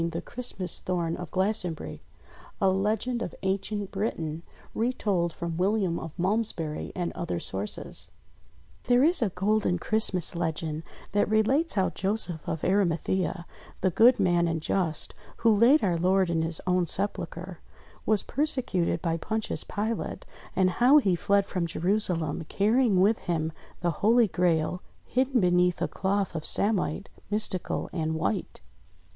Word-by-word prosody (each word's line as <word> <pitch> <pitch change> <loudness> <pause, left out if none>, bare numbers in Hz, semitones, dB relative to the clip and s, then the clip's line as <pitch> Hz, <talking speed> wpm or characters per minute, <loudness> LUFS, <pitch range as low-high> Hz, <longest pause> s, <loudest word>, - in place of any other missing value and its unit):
THE 165 0 -4
CHRISTMAS 190 -4 -4
THORN 170 -2 -2
OF 175 -3 -7
GLASTONBURY 190 -3 -2 0.6
A 195 -3 +3
Legend 220 +5 -1
of 180 - -4
Ancient 195 +1 -2
Britain 165 -6 -3 0.3
Retold 205 -7 0
from 170 0 -5
William 190 -2 +1
of 160 - -7
Malmesbury 180 -5 -1
and 175 -2 -2
Other 165 - -3
Sources 95 +3 -5 0.8
THERE 245 +1 +4
is 330 +1 +4
a 225 - +2
golden 195 0 +1
Christmas 190 -2 0
legend 160 -2 -2 0.3
that 205 0 +1
relates 255 +10 +2
how 190 -2 +1
Joseph 190 -5 +1
of 160 - -3
Arimathea 185 -1 0 0.2
— - - -22
the 185 - +2
good 235 +8 +5
man 175 -2 +3
and 165 -1 -1
just, 160 -1 -1 0.2
who 225 -2 +4
laid 245 +9 +5
our 180 -4 +1
Lord 185 +1 +2
in 165 -1 +1
his 165 0 0
own 180 -1 +1
sepulchre, 180 -2 +1 0.2
— - - -26
was 215 -2 +2
persecuted 255 - -1
by 165 -2 0
Pontius 220 +5 -2
Pilate, 220 +2 -3 0.3
and 185 -1 +3
how 250 +9 +5
he 195 -11 +3
fled 200 +3 +2
from 180 -3 -2
Jerusalem 175 -2 -1
carrying 215 -1 +3
with 210 +3 +3
him 160 -2 0 0.3
the 175 -1 +1
Holy 230 +2 +5
Grail 175 -1 0 0.2
hidden 260 0 +1
beneath 180 -1 +2
a - - 0
cloth 195 0 -1
of 160 - -3
samite, 200 -3 +1 0.2
mystical 210 -3 0
and 160 -2 -1
white. 180 +4 -2
185 Hz, 145 wpm, -27 LUFS, 170-215 Hz, 0.8 s, good